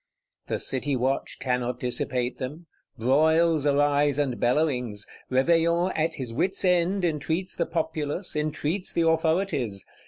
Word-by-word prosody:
The - - -1
City 135 +1 -1
watch 130 +2 -1
cannot 125 -1 -1
dissipate 125 0 -2
them; 145 +6 -6 0.3
broils 155 +5 +3
arise 145 0 +3
and 140 -4 -1
bellowings; 125 -6 0 0.3
Réveillon, 170 +6 +3
at 160 +1 0
his 125 -4 -5
wits' 190 +9 0
end, 180 +1 +2
entreats 165 +3 -1
the 170 - -1
Populace, 160 +1 -2
entreats 155 +4 -2
the 165 -1 +2
authorities. 160 - 0
150 Hz, 125 wpm, -26 LUFS, 130-170 Hz, 0.3 s, broils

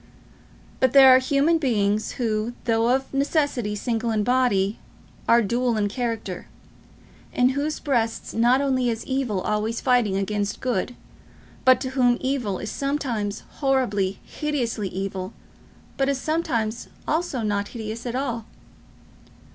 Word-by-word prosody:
But 260 -2 +3
there 265 -2 +9
are - - +6
human 285 +5 +2
beings 215 -6 0
who, 225 -1 -1
though 230 0 +2
of 265 +2 0
necessity 275 -6 0
single 230 +2 -2
in 215 -2 +1
body, 225 -5 +2 0.5
are 235 0 +6
dual 240 +2 0
in 205 -1 +1
character; 225 -5 -4 0.8
in 250 +1 +3
whose 285 +3 -2
breasts 235 -6 -1
not 240 +4 +3
only 260 -3 +1
is 225 -1 -3
evil 260 -8 -1
always 215 +3 -1
fighting 240 -6 +2
against 205 +1 -2
good, 245 -1 -2 0.7
but 255 -1 +6
to 260 -1 -3
whom 245 -2 +3
evil 260 -8 -1
is 215 - -5
sometimes 255 -8 -2 0.2
horribly, 210 -9 +1
hideously 245 -9 -2
evil, 190 +1 -4 0.6
but 270 0 +1
is 275 -2 0
sometimes 240 -7 -1 0.2
also 310 -6 -1
not 205 -1 -1
hideous 225 +1 -6
at 240 - -3
all. 240 -4 -2
240 Hz, 135 wpm, -24 LUFS, 215-265 Hz, 0.8 s, there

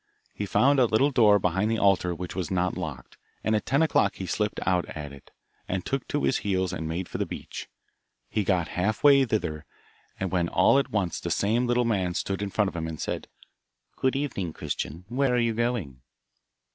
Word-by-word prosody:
He 100 - -4
found 140 +7 +4
a 125 - +5
little 130 +7 +3
door 110 -5 +6
behind 95 +2 0
the 115 - +1
altar 90 -4 +2
which 90 +1 -6
was 90 -4 -2
not 90 -1 0
locked, 75 -9 -6 0.3
and 110 - +2
at 105 - -2
ten 140 +5 +3
o'clock 105 -10 +2
he 95 - -5
slipped 105 +4 -1
out 90 -2 +2
at 75 -2 -7
it, 70 - -14 0.4
and 90 -1 -2
took 135 -1 -2
to 145 - -1
his - - +2
heels 95 -3 -1
and 80 - -4
made 85 +2 -3
for - - -6
the - - +1
beach. - - -7 0.6
He 110 - -2
had 100 - -5
got 90 -4 +2
half 100 +4 -1
way 140 -2 +7
thither, 80 -10 -2 0.6
when 90 -2 0
all 135 - +4
at 140 - -2
once 95 -6 -1
the - - -4
same 115 +5 +1
little 120 0 +2
man 95 -6 0
stood 95 +1 -2
in 100 - -2
front 105 +1 +1
of - - -13
him 80 -1 -3
and 80 -2 -6
said, - - -3 0.7
'Good 130 +1 0
evening, 120 - -2
Christian, 80 +4 -5
where 125 +2 +1
are - - +2
you 115 -1 +2
going? 110 - -2
100 Hz, 210 wpm, -27 LUFS, 90-120 Hz, 0.7 s, way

